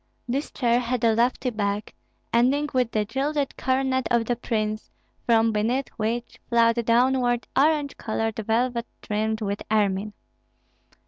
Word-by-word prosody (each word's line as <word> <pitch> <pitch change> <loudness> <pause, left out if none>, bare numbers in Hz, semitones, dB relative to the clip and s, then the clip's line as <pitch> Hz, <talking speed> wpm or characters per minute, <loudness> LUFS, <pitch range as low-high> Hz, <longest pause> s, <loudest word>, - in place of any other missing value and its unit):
This 270 +5 -2
chair 240 -2 +1
had 245 -1 -2
a 225 -1 +4
lofty 245 +2 +1
back, 205 -1 -2 0.4
ending 270 +5 +3
with 250 -3 +2
the 215 -2 0
gilded 275 +5 -1
coronet 260 0 0
of 235 -1 +2
the 245 - 0
prince, 215 -2 -2 0.4
from 225 -1 +4
beneath 235 +5 0
which 230 +2 -3
flowed 235 0 +3
downward 245 +1 +2
orange 290 0 +2
colored 225 0 -2
velvet 235 +2 0 0.2
trimmed 220 +1 -1
with 200 -1 -2
ermine. 205 -1 +1
235 Hz, 135 wpm, -25 LUFS, 220-255 Hz, 0.4 s, a